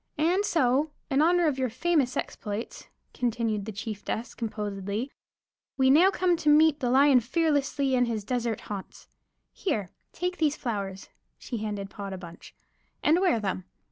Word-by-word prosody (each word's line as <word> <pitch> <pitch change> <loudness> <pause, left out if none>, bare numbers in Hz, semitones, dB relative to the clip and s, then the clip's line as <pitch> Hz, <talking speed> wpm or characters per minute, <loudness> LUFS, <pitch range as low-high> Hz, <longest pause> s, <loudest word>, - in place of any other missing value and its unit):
And 345 +6 +2
so, 300 - +2 0.2
in 270 +2 +3
honor 345 +2 +4
of 285 -4 +1
your 260 -1 +1
famous 280 +1 +1
exploits," 210 +2 -5 0.3
continued 225 -4 -1
the 220 - -5
chieftess, 215 +2 -5
composedly, 210 +2 -4 0.7
"we 265 -1 +5
now 340 +7 +7
come 365 -2 +2
to 305 -2 +1
meet 305 0 +5
the 245 - 0
lion 270 +1 +6
fearlessly 280 0 0
in 245 -1 +3
his 225 -3 -3
desert 235 -1 -2
haunts. 200 -2 -8 0.4
Here, 215 - -2 0.2
take 360 +1 -3
these 305 -2 +1
flowers" 200 -6 -4 0.3
(she 240 - -5
handed 205 -2 -4
Pod 200 -1 -6
a - - -5
bunch) 175 -2 -12 0.5
"and 320 +4 +4
wear 365 -12 +3
them. 190 -3 -3
250 Hz, 155 wpm, -27 LUFS, 210-305 Hz, 0.7 s, now